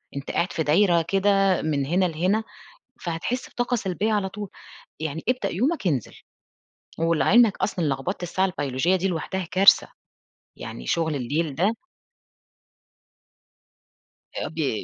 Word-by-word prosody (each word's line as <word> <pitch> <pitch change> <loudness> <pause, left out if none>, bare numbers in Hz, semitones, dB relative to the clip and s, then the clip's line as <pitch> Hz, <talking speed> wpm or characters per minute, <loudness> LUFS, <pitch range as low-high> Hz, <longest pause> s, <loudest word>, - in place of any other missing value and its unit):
أنت 140 - -5
قاعد 175 - -1
في 160 - -1
دايرة 170 +2 +4
كده 195 +1 +2
من 145 -3 -1
هنا 180 +5 +2
لهنا، 180 +7 0 0.6
فهتحِس 175 +9 -3
بطاقة 245 0 -1
سلبية 210 +1 -1
على 195 -2 0
طول، 205 -1 -7 0.5
يعني 160 0 -4
ابدأ 255 0 0
يومك 255 - 0
انزل. 135 -9 -1 0.8
ولِعِلمك 195 +7 +4
أصلًا 180 -5 -1
لغبطة 145 +7 -2
الساعة 190 +2 +1
البيولوجية 165 +1 0
دي 190 +2 -1
لوحدها 180 +1 -3
كارثة. 195 +2 +6 0.7
يعني - - -8
شُغل 160 -3 0
الليل 145 +3 -2
ده 200 +8 +1 2.7
آآ - - -2
ب 150 -9 -2
180 Hz, 125 wpm, -24 LUFS, 160-200 Hz, 2.7 s, كارثة